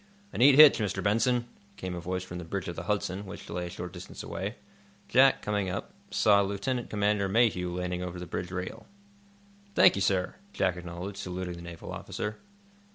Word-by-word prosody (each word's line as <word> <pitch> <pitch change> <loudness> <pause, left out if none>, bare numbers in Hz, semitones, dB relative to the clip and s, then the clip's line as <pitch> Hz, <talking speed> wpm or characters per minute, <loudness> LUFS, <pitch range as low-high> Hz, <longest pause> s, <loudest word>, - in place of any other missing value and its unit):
"A - - -4
neat 135 +2 +7
hitch, 150 -2 +9
Mr. 105 -3 -1
Benson," 120 +4 +2 0.3
came 95 -1 -4
a 90 - -4
voice 90 +2 -3
from 90 -1 -7
the - - -6
bridge 95 +4 -4
of 85 - -4
the 85 - -6
"Hudson," 100 -1 -1
which 95 - -9
lay 90 0 -3
a - - -6
short 90 0 -7
distance - - -9
away. - - -4 0.5
Jack, 130 +2 +5
looking 105 -2 0
up, 95 +2 -5 0.2
saw 100 -2 +4
Lieutenant 100 +6 -2
Commander 105 -1 +1
Mayhew 100 -5 +2
leaning 90 0 -3
over 90 0 -5
the 90 - -6
bridge 90 +1 -4
rail. 90 0 -6 0.9
"Thank - - +7
you, 100 - -2
sir," 95 -1 +1 0.2
Jack 90 -2 +1
acknowledged, 90 +3 -7
saluting 90 -2 -4
the 85 - -9
naval 85 -1 -8
officer. 105 +1 -5
95 Hz, 190 wpm, -29 LUFS, 90-105 Hz, 0.9 s, hitch